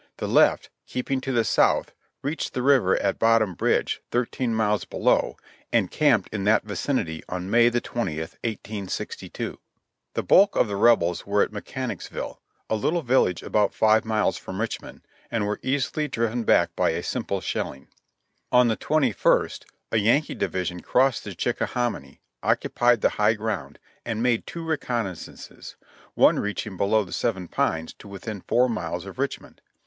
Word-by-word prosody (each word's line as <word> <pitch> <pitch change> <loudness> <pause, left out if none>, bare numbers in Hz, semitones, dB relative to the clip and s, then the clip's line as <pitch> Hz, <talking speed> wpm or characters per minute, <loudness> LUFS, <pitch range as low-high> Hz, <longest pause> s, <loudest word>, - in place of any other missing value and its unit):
The - - -3
left, - - +3 0.2
keeping 130 +1 -2
to 135 - -3
the 120 -3 +2
south, 110 - +2 0.3
reached 145 +4 -3
the 125 - -1
river 130 -9 +4
at 100 - -1
Bottom 115 -4 +3
Bridge, - - 0
thirteen 120 0 -1
miles 105 -2 +1
below, - - +1 0.3
and - - +2
camped 135 -10 +3
in 100 -3 -2
that 105 +1 +4
vicinity 100 - -2
on 90 +1 -4
May 120 0 +6
the 120 0 0
twentieth, 80 -11 -3
1862. 105 -3 -5 0.6
The - - -1
bulk 200 +2 +5
of - - +3
the 100 - -3
Rebels 100 -6 +3
were 100 0 +3
at - - -3
Mechanicsville, 120 +4 -6 0.3
a - - 0
little 160 +10 0
village 120 -8 +2
about 105 -2 +1
five 110 0 +4
miles 110 -1 0
from 95 +1 -7
Richmond, 115 0 -5 0.3
and 115 -3 -1
were 105 0 -2
easily 145 +3 -1
driven 115 -2 -1
back - - +3
by - - +2
a - - -2
simple - - -2
shelling. 70 +1 -4 0.6
On 125 -1 +5
the 110 - 0
21st 140 -8 +1 0.3
a - - +2
Yankee 115 +8 +2
division 90 -1 -2
crossed 130 +6 +1
the 100 -3 -6
Chickahominy, 120 - -2 0.2
occupied 120 -2 +2
the - - +4
high 105 +2 +4
ground, 100 -11 -4 0.3
and 115 -1 -2
made 120 -2 +1
two 170 -1 -6
recon 125 -8 -1
naissances, 95 -3 -9 0.4
one - - +5
reaching 105 -1 -3
below 105 +3 +2
the 90 - -10
Seven 95 -7 -1
Pines 80 -1 -1
to - - -12
within 100 +1 -7
four 125 +6 +2
miles 90 -9 -3
of - - -10
Richmond. - - -4
110 Hz, 160 wpm, -25 LUFS, 100-125 Hz, 0.6 s, May